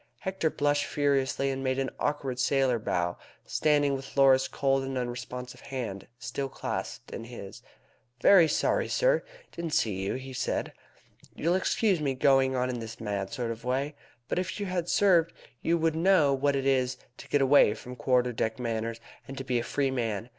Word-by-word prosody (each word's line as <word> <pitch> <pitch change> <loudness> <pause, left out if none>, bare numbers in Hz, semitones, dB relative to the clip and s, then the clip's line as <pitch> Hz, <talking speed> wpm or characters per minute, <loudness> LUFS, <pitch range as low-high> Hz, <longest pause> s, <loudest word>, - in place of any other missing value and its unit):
Hector 190 -4 -1
blushed 145 -1 +1
furiously, 135 -1 +1
and 135 0 -4
made 130 0 0
an 135 -1 -1
awkward 135 -4 -2
sailor 130 -2 +2
bow, 90 -4 -1 0.3
standing 145 -2 +2
with 135 +1 -6
Laura's 135 -1 +5
cold 135 -1 +1
and 135 0 -3
unresponsive 125 0 -5
hand 120 -8 -5
still 135 +2 -4
clasped - - -5
in 115 - -6
his. 115 -5 -9 0.6
"Very 185 -5 +7
sorry, - - +1
sir - - +2 0.3
didn't 170 -3 -3
see 100 -4 +1
you," 95 - -2
he 130 0 -7
said. - - -2 0.6
"You'll 170 +3 +1
excuse 190 -1 +1
my 140 -2 0
going 135 0 +3
on 125 0 +1
in 125 -1 -3
this 115 0 -8
mad 100 -3 -3
sort 125 -4 -3
of 115 0 -7
way, 135 +4 -1 0.3
but - - -1
if 185 +3 -3
you 205 - -2
had 180 -2 -2
served 175 -5 +4 0.3
you 170 +1 +2
would 165 -1 +1
know 165 -4 +4
what 140 +1 +1
it 135 -1 -1
is 130 -2 +2 0.2
to - - -11
get 145 -1 +3
away 135 -6 +5
from 125 0 -9
quarter 125 0 +1
deck 110 0 -1
manners, 115 -1 -3 0.3
and 135 - -8
to 135 - -4
be 125 -2 0
a - - -3
free 135 +2 0
man. 115 -3 -2
135 Hz, 185 wpm, -28 LUFS, 125-145 Hz, 0.6 s, Very